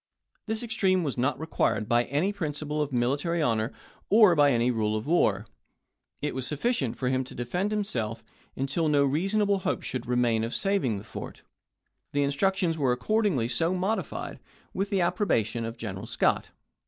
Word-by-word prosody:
This 220 Hz, +1 st, -2 dB
extreme 190 Hz, -6 st, +1 dB
was 140 Hz, -5 st, -2 dB
not 130 Hz, +4 st, 0 dB
required 155 Hz, -8 st, 0 dB
by 120 Hz, 0 st, +3 dB
any 155 Hz, -, 0 dB
principle 150 Hz, -4 st, -3 dB
of 150 Hz, -1 st, -2 dB
military 140 Hz, +7 st, 0 dB
honor 115 Hz, -5 st, +1 dB, 0.4 s
or 210 Hz, -3 st, +7 dB
by 145 Hz, -2 st, +5 dB
any 120 Hz, 0 st, +2 dB
rule 110 Hz, -2 st, 0 dB
of 110 Hz, +1 st, -3 dB
war. 110 Hz, -, +2 dB, 0.8 s
It 150 Hz, -, -1 dB
was 130 Hz, -1 st, -3 dB
sufficient 150 Hz, -, -1 dB
for 125 Hz, -, -1 dB
him 130 Hz, 0 st, +1 dB
to 125 Hz, -, -11 dB
defend 175 Hz, -, -1 dB
himself 115 Hz, -, -2 dB, 0.3 s
until 140 Hz, +5 st, 0 dB
no 145 Hz, -2 st, +4 dB
reasonable 195 Hz, +8 st, +1 dB
hope -, -, -2 dB
should 125 Hz, -2 st, -4 dB
remain 120 Hz, -2 st, +2 dB
of 115 Hz, -, -3 dB
saving 195 Hz, -, +1 dB
the 100 Hz, -, -8 dB
fort. 105 Hz, -, -8 dB, 0.7 s
The 145 Hz, 0 st, +2 dB
instructions 165 Hz, +3 st, +1 dB
were 135 Hz, -3 st, +2 dB
accord 215 Hz, -, +1 dB
ingly 125 Hz, -, 0 dB
so 165 Hz, +7 st, +1 dB
modified, 195 Hz, +5 st, -2 dB, 0.3 s
with 195 Hz, +1 st, -1 dB
the 195 Hz, -3 st, +1 dB
approbation 120 Hz, -, 0 dB
of 115 Hz, +1 st, -6 dB
General 100 Hz, -1 st, -6 dB
Scott. 120 Hz, 0 st, +1 dB
145 Hz, 170 wpm, -27 LUFS, 120-185 Hz, 0.8 s, or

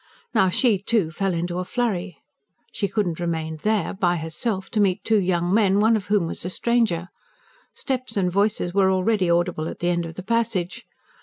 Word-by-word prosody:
Now, 190 Hz, -, +4 dB
she, 215 Hz, +1 st, +2 dB
too, 200 Hz, -6 st, +1 dB
fell 195 Hz, +4 st, -1 dB
into 175 Hz, +1 st, -2 dB
a -, -, -1 dB
flurry. 195 Hz, -, -2 dB, 0.5 s
She 200 Hz, -, -1 dB
could 205 Hz, +2 st, 0 dB
not 170 Hz, -2 st, -3 dB
remain 160 Hz, -2 st, -2 dB
there, 215 Hz, +5 st, 0 dB
by 180 Hz, -3 st, +1 dB
herself, 190 Hz, +5 st, -3 dB
to 215 Hz, -, 0 dB
meet 200 Hz, -1 st, +2 dB
two 220 Hz, -1 st, +3 dB
young 175 Hz, -1 st, 0 dB
men, 200 Hz, -2 st, +4 dB
one 220 Hz, +2 st, +4 dB
of 210 Hz, -3 st, -3 dB
whom 205 Hz, -4 st, +2 dB
was 165 Hz, -, -5 dB
a 180 Hz, -, -3 dB
stranger: 215 Hz, -5 st, 0 dB, 0.7 s
steps 255 Hz, -4 st, -3 dB
and 180 Hz, -2 st, +1 dB
voices 200 Hz, -2 st, 0 dB
were 195 Hz, -1 st, +4 dB
already 190 Hz, 0 st, +1 dB
audible 170 Hz, -2 st, +1 dB
at -, -, -6 dB
the 175 Hz, -, -1 dB
end 170 Hz, -1 st, 0 dB
of 165 Hz, -, -9 dB
the 185 Hz, -, -7 dB
passage. 220 Hz, -5 st, -1 dB
190 Hz, 200 wpm, -23 LUFS, 175-215 Hz, 0.7 s, Now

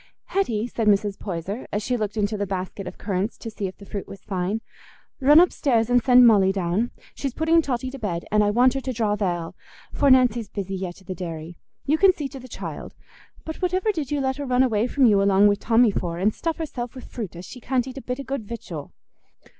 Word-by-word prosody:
"Hetty," 235 Hz, -, 0 dB
said 230 Hz, -3 st, -2 dB
Mrs. 205 Hz, -1 st, +2 dB
Poyser, 195 Hz, +4 st, -5 dB
as 205 Hz, +1 st, -2 dB
she 250 Hz, -, 0 dB
looked 215 Hz, -2 st, -3 dB
into 210 Hz, +1 st, 0 dB
the 205 Hz, -1 st, -2 dB
basket 190 Hz, +1 st, -4 dB
of -, -, -8 dB
currants 200 Hz, +2 st, -2 dB
to 225 Hz, -, -7 dB
see 205 Hz, -2 st, -3 dB
if 185 Hz, -, -9 dB
the 200 Hz, -, -13 dB
fruit 200 Hz, -1 st, -6 dB
was 195 Hz, -, -11 dB
fine, 195 Hz, +2 st, -2 dB, 0.6 s
"run 290 Hz, +4 st, +7 dB
upstairs 245 Hz, -9 st, +2 dB
and 245 Hz, 0 st, +5 dB
send 250 Hz, -1 st, +7 dB
Molly 200 Hz, -4 st, +5 dB
down. 195 Hz, +5 st, 0 dB, 0.2 s
She's 275 Hz, -3 st, -4 dB
putting 325 Hz, +1 st, +3 dB
Totty 260 Hz, -3 st, -3 dB
to 275 Hz, -, -8 dB
bed, 175 Hz, -6 st, -3 dB
and 210 Hz, 0 st, +4 dB
I 205 Hz, -, +2 dB
want 245 Hz, +4 st, +4 dB
her 270 Hz, -, -2 dB
to 260 Hz, -1 st, -3 dB
draw 215 Hz, -3 st, 0 dB
th' 210 Hz, -, -11 dB
ale, 175 Hz, -4 st, -2 dB, 0.4 s
for 285 Hz, -, +3 dB
Nancy's 245 Hz, -4 st, +4 dB
busy 195 Hz, -1 st, -4 dB
yet 185 Hz, -2 st, -5 dB
i' -, -, -20 dB
the 185 Hz, -, -4 dB
dairy. 165 Hz, -1 st, -6 dB, 0.3 s
You 305 Hz, +3 st, +2 dB
can 385 Hz, -1 st, +6 dB
see 295 Hz, -5 st, -4 dB
to 270 Hz, -, -9 dB
the 255 Hz, -, -11 dB
child. -, -, -7 dB, 0.5 s
But 320 Hz, -, -5 dB
whativer 370 Hz, +3 st, 0 dB
did 305 Hz, -7 st, -3 dB
you 290 Hz, -1 st, -1 dB
let 265 Hz, 0 st, -1 dB
her 285 Hz, -, -4 dB
run 255 Hz, 0 st, +3 dB
away 225 Hz, -2 st, +1 dB
from 270 Hz, +1 st, +2 dB
you 205 Hz, -4 st, +5 dB
along 200 Hz, 0 st, +4 dB
wi' 205 Hz, -, +5 dB
Tommy 225 Hz, +2 st, +3 dB
for, 170 Hz, -3 st, -3 dB
and 205 Hz, +4 st, +1 dB
stuff 330 Hz, -1 st, -3 dB
herself 255 Hz, -6 st, -5 dB
wi' 255 Hz, -, -8 dB
fruit 215 Hz, -8 st, -7 dB
as 175 Hz, +2 st, -8 dB
she 250 Hz, -, -10 dB
can't 250 Hz, +1 st, 0 dB
eat 265 Hz, +1 st, -7 dB
a -, -, -10 dB
bit 250 Hz, +1 st, -4 dB
o' -, -, -4 dB
good 270 Hz, -3 st, -4 dB
victual?" 180 Hz, -10 st, -7 dB
225 Hz, 240 wpm, -24 LUFS, 195-260 Hz, 0.6 s, run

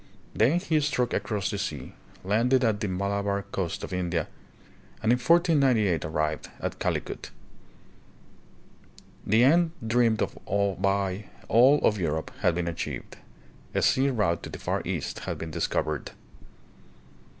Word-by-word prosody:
Then 135 Hz, +11 st, +3 dB
he 160 Hz, -4 st, +1 dB
struck 135 Hz, -5 st, 0 dB
across 105 Hz, -2 st, -1 dB
the 100 Hz, -, -3 dB
sea, 75 Hz, -9 st, -5 dB, 0.3 s
landed 120 Hz, +7 st, +2 dB
at 110 Hz, -3 st, +2 dB
the 105 Hz, -, -2 dB
Malabar 100 Hz, +1 st, -1 dB
coast 95 Hz, +2 st, -4 dB
of -, -, -6 dB
India, 85 Hz, -3 st, -1 dB, 0.8 s
and 110 Hz, -, +3 dB
in 125 Hz, -, +3 dB
1498 135 Hz, -, +3 dB
arrived 75 Hz, 0 st, -2 dB
at -, -, -4 dB
Calicut. -, -, -3 dB, 2.0 s
The 110 Hz, +4 st, +5 dB
end 165 Hz, +4 st, +4 dB
droamed 115 Hz, -1 st, +2 dB
of -, -, -5 dB, 0.4 s
by 100 Hz, 0 st, 0 dB, 0.2 s
all 125 Hz, +7 st, +6 dB
of 105 Hz, -, +2 dB
Europe 80 Hz, -2 st, -2 dB
had 85 Hz, -, +2 dB
been 85 Hz, -1 st, -1 dB
achieved. 85 Hz, -, -5 dB, 0.6 s
A -, -, +2 dB
sea 135 Hz, +1 st, +3 dB
route 105 Hz, -10 st, 0 dB
to -, -, -7 dB
the -, -, -7 dB
Far -, -, -2 dB
East -, -, -3 dB
had -, -, -4 dB
been 80 Hz, -, -6 dB
discovered. 75 Hz, 0 st, -2 dB
105 Hz, 140 wpm, -27 LUFS, 90-125 Hz, 2.0 s, all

